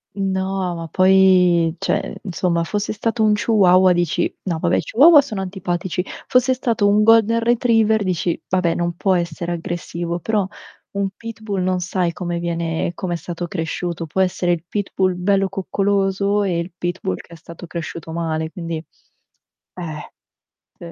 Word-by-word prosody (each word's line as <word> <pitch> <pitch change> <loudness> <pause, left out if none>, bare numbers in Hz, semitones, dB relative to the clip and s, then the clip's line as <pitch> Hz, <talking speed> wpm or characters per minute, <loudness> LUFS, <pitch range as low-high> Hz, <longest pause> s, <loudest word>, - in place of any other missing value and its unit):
No, 190 -1 -1
ma 165 -1 -6
poi 185 -3 +4
cioè - - -2
insomma 175 -2 0
fosse 205 +4 -2
stato 225 +1 -1
un 215 - +4
chihuahua 190 -4 +4
dici 175 -2 0
no 175 -4 -2
vabbè - - +1
i - - +2
chihuahua 295 +5 +6
sono 215 -8 -5
antipatici, 180 -1 -3 0.2
fosse 255 +1 +3
stato 230 -5 +1
un 210 +1 +4
Golden 225 0 +5
Retriever 225 -2 +2
dici: 175 -2 -1
"Vabbè, 180 -3 +1
non 175 0 -1
può 190 +1 +1
essere 170 0 -2
aggressivo", 170 0 -4
però 205 +1 0 0.4
un 200 -1 -1
pitbull 220 -4 -5
non 185 0 0
sai 180 -1 -1
come 175 0 -3
viene 170 0 -2
come 180 -2 -3
è - - -1
stato 175 0 -5
cresciuto. 165 0 -4
Può 190 +5 0
essere 180 -1 +1
il 165 -1 -4
pitbull 190 -2 -1
bello 195 +1 +1
coccoloso 195 +1 0
e 180 -4 0
il 170 +2 -5
pitbull 175 - -3
che - - -13
è - - -9
stato 170 +2 -11
cresciuto 165 -1 -6
male, 160 -1 -2
quindi 165 -2 -5 1.0
eh. 160 -4 -7 0.7
Sì. 170 -1 -10
185 Hz, 160 wpm, -20 LUFS, 170-200 Hz, 1.0 s, chihuahua